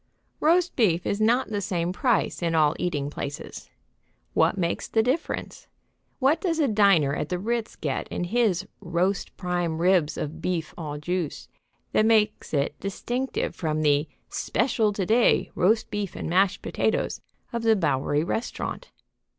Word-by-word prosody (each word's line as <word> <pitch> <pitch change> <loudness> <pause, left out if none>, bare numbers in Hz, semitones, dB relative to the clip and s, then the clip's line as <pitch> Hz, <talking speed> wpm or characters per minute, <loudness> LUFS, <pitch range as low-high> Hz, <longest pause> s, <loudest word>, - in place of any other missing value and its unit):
Roast 345 +3 +3
beef 180 -8 +2
is 205 - -1
not 240 +4 +3
the 205 -2 -2
same 175 -2 -1
price 240 -1 +1
in 165 -1 0
all 155 -1 +4
eating 145 -5 -1
places. 140 -1 -6 0.6
What - - +3
makes 170 -2 -1
the 225 - +2
difference? 260 +7 -2 0.5
What 290 +5 +2
does 335 -4 0
a 300 -3 +3
diner 200 - +4
at 150 - -3
the 180 - -1
Ritz 230 +4 -2
get - - -3
in - - -3
his 205 -2 +1
"roast 185 +1 -1
prime 175 -3 -1
ribs 170 -3 +2
of 150 +1 -5
beef 170 -4 -2
au 150 -4 -5
jus" 170 +1 -3 0.4
that 215 - +3
makes 215 -2 +2
it 140 -2 -1
distinctive 245 +7 -3
from 155 -2 -1
the 145 +1 +3 0.2
"Special 225 -1 0
to 200 -2 -2
day 230 +5 +3
roast 215 +6 +2
beef 205 -3 -3
and - - -4
mashed 185 +3 +2
potatoes" - - -1 0.3
of 235 - -1
the 225 -1 +4
Bowery 145 -4 +1
restaurant? 225 +7 -4
185 Hz, 155 wpm, -26 LUFS, 165-225 Hz, 0.6 s, all